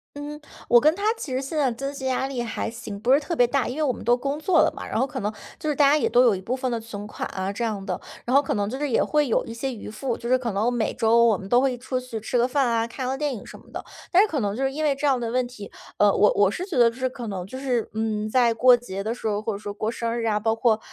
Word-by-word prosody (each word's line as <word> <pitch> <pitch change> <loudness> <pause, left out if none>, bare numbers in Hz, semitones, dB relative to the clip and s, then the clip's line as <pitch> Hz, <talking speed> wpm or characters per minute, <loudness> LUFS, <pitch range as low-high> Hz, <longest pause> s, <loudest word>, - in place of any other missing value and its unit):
嗯， 295 +1 -7 0.3
我 240 0 +7
跟 310 +3 +4
他 400 - -6 0.2
其 270 - -6
实 255 - 0
现 275 +4 -5
在 295 -2 +2
的 - - -3
经 275 +3 -4
济 265 -2 -7
压 260 +1 0
力 260 -3 -3
还 230 -1 -3
行， 225 -3 -7
不 250 +5 +3
是 285 - +6
特 330 +3 -4
别 245 - +5
大， 265 +1 0
因 250 +5 -5
为 310 - 0
我 260 -4 +1
们 - - -9
都 240 +2 +3
工 280 +4 -3
作 345 +2 +3
了 - - +2
嘛， - - -7
然 - - -2
后 265 - +3
可 - - -6
能 210 +1 -1 0.3
就 310 - -2
是 295 - 0
大 285 - +5
家 290 - +5
也 305 - +1
都 245 +1 +5
有 225 -5 +4
一 185 - -6
部 245 +6 -2
分 255 -1 -2
的 230 - -1
存 210 -2 -7
款 - - -5
啊 190 +1 -3
这 235 - -3
样 205 -4 -2
的。 185 -3 -3 0.3
然 250 +3 +1
后 280 - +7
可 275 - -2
能 205 -1 0 0.2
也 - - +2
会 300 -2 +1
有 225 - +1
一 230 - -7
些 265 +3 -3
余 225 - -8
富， 230 +3 -3
就 235 - -7
是 255 - +4
可 245 -3 -2
能 220 +5 0
每 235 - 0
周 230 +1 +4
我 220 -4 +4
们 195 - -9
都 245 +4 +4
会 260 -2 +1
出 255 +1 -3
去 250 -3 -6
吃 240 +3 -1
个 245 - +3
饭 265 0 +1
啊， 230 0 +1
看 255 +2 -5
个 265 - -1
电 290 -2 -2
影 - - -9
什 - - -11
么 - - -20
的。 - - -6 0.3
但 360 - +5
是 - - +1
可 300 -7 -2
能 205 -1 -1
就 270 - -2
是 270 - +1
因 310 +3 -3
为 285 -2 +2
这 290 - -3
样 265 -3 +3
的 230 -1 -3
问 250 +1 0
题， 210 -5 -10 0.3
呃， 205 -1 +5
我 210 - +4
我 200 -1 +4
是 360 - -4
觉 370 -7 -6
得 240 -2 +6
就 230 - -11
是 260 0 -1
可 245 -2 -7
能 185 -3 -4
就 260 +7 -8
是， 250 -4 -1
嗯， 215 -1 -1
在 240 0 +3
过 245 +2 +6
节 195 -5 -6
的 225 +2 -2
时 225 - -5
候， 205 -1 0
或 220 0 -3
者 200 - -6
说 205 -1 -6
过 215 +2 -3
生 235 0 -2
日 230 - -2
啊， 210 -1 +1
包 225 +1 +1
括， 225 -2 +2
240 Hz, 360 characters per minute, -24 LUFS, 220-270 Hz, 0.3 s, 我